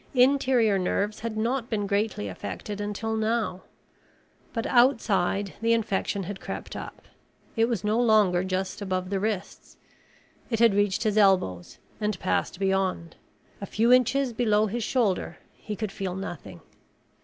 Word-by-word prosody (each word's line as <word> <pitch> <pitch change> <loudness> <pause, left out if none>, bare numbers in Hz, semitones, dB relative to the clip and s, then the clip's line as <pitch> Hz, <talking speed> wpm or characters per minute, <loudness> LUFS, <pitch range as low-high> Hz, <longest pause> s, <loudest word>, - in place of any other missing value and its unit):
Interior 250 -5 +4
nerves 205 +3 -1
had 225 -1 -4
not 235 +2 -1
been 210 -3 -1
greatly 200 - -1
affected 205 - -6
until 210 +2 -3
now. 220 -4 -1 0.9
But 230 0 -3
outside 205 -6 +2
the 230 0 +3
infection 200 -3 -1
had 195 +2 -6
crept - - -6
up. - - -8 0.5
It 225 - +3
was 225 -7 -2
no 215 +2 +1
longer 210 -6 +4
just 190 +1 -3
above 185 -1 -2
the 195 - 0
wrists. 205 -2 -4 0.7
It 225 - 0
had 230 -2 +5
reached 205 0 +1
his 215 -1 +2
elbows 180 - +2 0.2
and 210 -4 -1
passed 185 - -1
beyond. 190 -3 -1 0.5
A 200 - -5
few 230 +3 +3
inches 255 +1 +3
below 215 -2 +2
his 225 +3 -3
shoulder 220 -6 0 0.2
he 210 - -7
could 215 -1 -4
feel 190 -2 -4
nothing. 190 -4 -7
210 Hz, 145 wpm, -26 LUFS, 190-230 Hz, 0.9 s, had